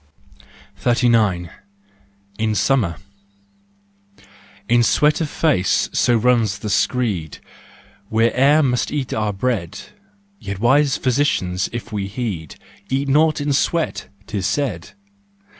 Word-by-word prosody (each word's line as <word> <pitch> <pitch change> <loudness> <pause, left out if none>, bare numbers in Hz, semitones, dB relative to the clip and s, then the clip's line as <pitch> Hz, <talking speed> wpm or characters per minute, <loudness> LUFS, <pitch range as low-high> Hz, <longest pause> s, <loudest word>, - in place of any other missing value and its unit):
39 115 -8 +1 0.4
* 100 0 -34
In 110 -1 0
Summer. 105 -8 +1 1.7
In 120 +1 +4
sweat 150 - +2
of 155 - -2
face, 140 - +1
so 120 -1 +3
runs 115 -4 +2
the 105 0 -5
screed, 100 - -1 0.7
We 110 +1 +2
e'er 145 +4 +4
must 125 -3 0
eat 145 -3 -3
our 105 -1 -1
bread, 100 -3 -2 0.6
Yet 100 0 -6
wise 135 +6 +3
physicians 110 -9 0
if 120 0 -7
we 100 -2 -2
heed 100 - -5 0.2
" - - -28
Eat 135 +1 -1
naught 155 +3 +3
in 145 0 -1
sweat," 165 +4 -1 0.2
'tis 100 -2 -3
said. 140 +6 -3
115 Hz, 120 wpm, -20 LUFS, 100-135 Hz, 1.7 s, In